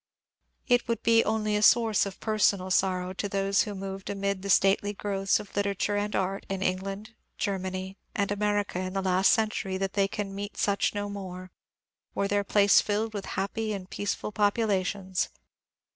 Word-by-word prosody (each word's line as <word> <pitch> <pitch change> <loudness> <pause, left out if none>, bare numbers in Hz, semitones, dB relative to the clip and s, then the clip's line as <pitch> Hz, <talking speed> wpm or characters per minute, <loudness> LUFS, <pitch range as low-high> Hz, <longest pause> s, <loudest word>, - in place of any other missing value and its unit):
It 245 -2 +3
would 230 -1 -2
be 230 0 +5
only 215 -1 0
a 210 - +1
source 220 -2 +4
of 195 - -9
personal 200 -3 +1
sorrow 185 -1 +1
to 200 +2 -3
those 195 0 +2
who 205 -2 -3
moved 195 0 -6
amid 200 -1 -2
the 200 - -5
stately 195 +1 +3
growths 195 -1 0
of 205 - -11
literature 200 0 0
and 205 +1 -1
Bxt 195 +1 -1
in 195 0 -2
Eng 185 -1 +1
land, 195 +3 -7 0.2
Germany, 190 -1 -3 0.2
and 200 -1 0
America 205 -2 0
in 185 0 -3
the 195 -1 -1
last 185 0 +4
century 215 -3 0
that 195 0 -2
they 200 -1 +2
can 195 0 -4
meet 200 +1 -6
such 200 +1 +1
no 205 0 -2
more, 185 -2 -7 0.6
were 200 - +1
their 205 0 +1
place 200 0 +5
filled 215 +1 -1
with 200 -2 -4
happy 215 +3 -1
and 190 -2 -7
peaceful 205 +1 -3
populations. 205 -3 0
200 Hz, 175 wpm, -28 LUFS, 190-205 Hz, 0.6 s, be